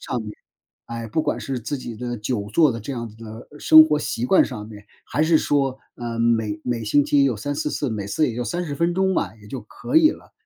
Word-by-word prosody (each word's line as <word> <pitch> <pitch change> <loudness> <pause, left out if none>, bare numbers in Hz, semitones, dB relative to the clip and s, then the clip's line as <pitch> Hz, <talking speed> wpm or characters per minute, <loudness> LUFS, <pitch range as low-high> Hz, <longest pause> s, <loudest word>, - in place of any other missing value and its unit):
食 - - -12
上 125 - -1
面， 105 -1 -7 0.5
哎， 115 -1 -6
不 155 +8 0
管 150 - -1
是 130 -3 -4
自 145 +6 -3
己 120 -3 -7
的 120 +1 -4
久 105 -2 -3
坐 155 -6 +5
的 115 - -6
这 120 - -7
样 115 -2 -4
子 110 - -16
的 110 +1 -9
生 155 +1 +8
活 150 -1 +1
习 120 -4 -3
惯 190 - +5
上 105 -5 -5
面， 105 -1 -12 0.2
还 150 - -1
是 160 0 +4
说， 135 -3 0 0.2
嗯， 120 -1 -5
每 110 -3 +1
每 120 -2 -2
星 140 +7 +3
期 140 -1 +3
有 125 -5 +1
3-4 145 +5 -3
次， 140 -5 -2
每 105 -2 -4
次 150 +9 +1
也 - - -7
就 125 - -2
30 175 -3 -3
分 170 +3 0
钟 190 0 +1
吧， - - -1
也 - - -14
就 130 +3 -6
可 110 - -4
以 315 -1 +7
了。 - - -12
125 Hz, 260 characters per minute, -22 LUFS, 110-150 Hz, 0.5 s, 生